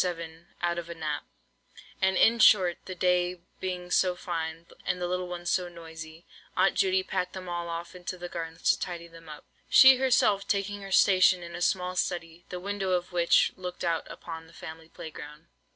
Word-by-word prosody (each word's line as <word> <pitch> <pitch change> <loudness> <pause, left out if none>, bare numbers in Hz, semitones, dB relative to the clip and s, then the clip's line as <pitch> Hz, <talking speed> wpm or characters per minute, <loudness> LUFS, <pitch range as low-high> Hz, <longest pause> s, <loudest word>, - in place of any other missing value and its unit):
7 165 -1 -4 0.2
out 175 0 +1
of 170 0 -8
a 170 - -6
nap; 155 -2 -3 0.8
and, 190 0 +3
in 230 +1 +5
short, 185 -5 +5
the 185 - -6
day 180 0 +1 0.2
being 180 -1 -4
so 180 -1 +3
fine, 165 -2 -4 0.2
and 180 - -1
the 180 - -2
little 180 0 -2
ones 175 0 -3
so 180 -1 0
noisy, 160 -1 -10 0.3
Aunt 190 +1 +4
Judy 190 -1 +2
packed 185 -1 -2
them 185 -1 -7
all 175 -1 -3
off 170 +1 -5
into 180 0 -6
their 175 0 -6
gardens 165 -1 -7
to - - -2
tidy 170 -1 -5
them 165 -1 -14
up, 150 -1 -10 0.2
she 265 -1 +9
herself 240 -6 +2
taking 200 0 -1
her 195 0 -8
station 185 -2 +5
in 170 0 -9
a 175 - -6
small 180 0 0
study, 175 -2 -3
the 180 - -5
window 195 0 -2
of 180 0 -1
which 175 -1 +4
looked 180 -1 -6
out 165 -2 -1
upon 165 -1 -8
the 165 - -19
family 160 0 -10
play 160 - -9
ground. 150 +1 -11
175 Hz, 200 wpm, -28 LUFS, 165-185 Hz, 0.8 s, she